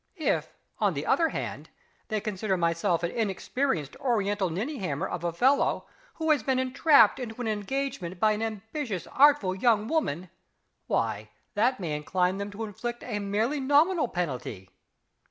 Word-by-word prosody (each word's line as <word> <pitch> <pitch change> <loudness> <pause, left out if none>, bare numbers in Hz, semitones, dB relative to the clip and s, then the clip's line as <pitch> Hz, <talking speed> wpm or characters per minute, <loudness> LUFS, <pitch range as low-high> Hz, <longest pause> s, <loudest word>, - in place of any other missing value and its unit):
If, 315 - -1 0.2
on - - +2
the - - -3
other 330 -1 +3
hand, - - -5 0.4
they 215 -1 -1
consider 200 -1 -2
myself 170 +1 +1
an 170 - 0
inexperienced 215 - -1
Oriental 205 -6 0
ninnyhammer 190 - -2
of 175 -1 -5
a 170 - 0
fellow, 265 +11 +2 0.3
who 320 -1 +1
has 295 - +3
been 265 -1 0
entrapped 270 +3 +5
into 235 -2 -6
an 245 - -2
engagement 215 -3 -3
by 215 +2 +4
an 215 +1 -1
ambitious, 220 - -4
artful 275 -9 +5
young 215 +2 +2
woman 185 - -1 0.6
why, - - -1 0.2
that 235 +4 +2
may 165 -5 -2
incline 180 +5 0
them 200 0 -3
to 205 +2 -6
inflict 240 +3 -5
a 210 -4 -3
merely 215 +8 0
nominal 295 +4 +3
penalty." 130 - -4
215 Hz, 155 wpm, -28 LUFS, 185-265 Hz, 0.6 s, entrapped